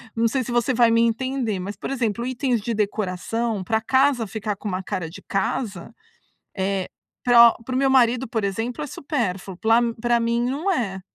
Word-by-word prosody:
não 230 0 +2
sei 260 +3 -1
se 240 - -6
você 240 +2 +1
vai 235 -1 +5
me 230 - +4
entender, 235 -2 0
mas 200 +3 -5
por - - -6
exemplo, 235 -3 -1
itens 250 -2 0
de 230 +3 -2
decoração 210 +1 -2
pra 220 +3 0
casa 260 -1 +2
ficar 210 -1 -3
com 210 - -8
uma 185 0 -3
cara 185 -5 -4
de 165 - -11
casa, 195 0 -3 0.6
eh, 190 -1 -1 0.4
pra 235 -1 +8
para 255 - -4
o - - +1
meu 270 0 +3
marido, 250 -1 +3
por 220 -1 -2
exemplo, 225 +8 -3
é - - -5
supérfluo, 195 - -3
pla 225 +1 +4 0.2
pra 240 0 +2
mim 235 +1 0
não 300 +9 -1
é. 195 - -2
230 Hz, 195 wpm, -23 LUFS, 200-250 Hz, 0.6 s, pra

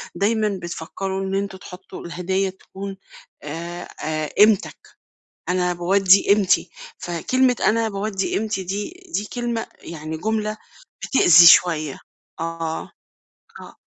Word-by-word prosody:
دايمًا 210 -2 0
بتفكّروا 190 +3 -4
إن 190 0 -2
أنتم 195 -1 -3
تحطّوا 185 0 -11
الهدايا 190 +3 -1
تكون 195 +1 -9 0.5
آآ 170 +4 -6
آآ 155 -1 -2
قيمتك. 210 -1 +2 0.5
أنا 180 0 +1
باودّي 190 +2 +4
قيمتي، 195 -3 +3 0.3
فكلمة 250 +9 +1
أنا 225 +1 +2
باودّي 200 -1 -3
قيمتي 210 -2 -1
دي، 200 - -3 0.2
دي 205 - 0
كلمة 240 -2 -2
يعني 160 -1 -7
جملة 215 +3 -2 0.5
بتأذي 175 -9 +7
شوية. 155 -4 +5 0.4
آه. 165 -1 -4 0.7
آه. - - -12
190 Hz, 110 wpm, -22 LUFS, 170-210 Hz, 0.7 s, بتأذي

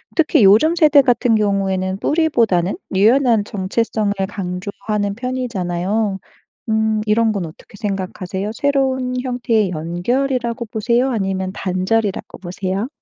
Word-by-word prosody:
특히 310 - +3
요즘 225 - +5
세대 305 -4 +6
같은 245 -2 +2
경우에는 195 -2 0
뿌리보다는 230 - +1 0.2
유연한 230 +1 +4
정체성을 205 +1 -1 0.2
강조하는 200 +2 -3
편이잖아요. 210 -5 -2 0.5
음. 220 0 +1
이런 220 +1 +2
건 195 -5 -2
어떻게 160 +5 -15
생각하세요? 195 -1 -4
새로운 260 -2 0
형태의 235 -6 0
연결이라고 235 - -1
보세요 235 +4 0
아니면 190 -4 -2
단절이라고 195 +3 -1
보세요? 190 +4 -3
215 Hz, 325 characters per minute, -19 LUFS, 190-245 Hz, 0.5 s, 세대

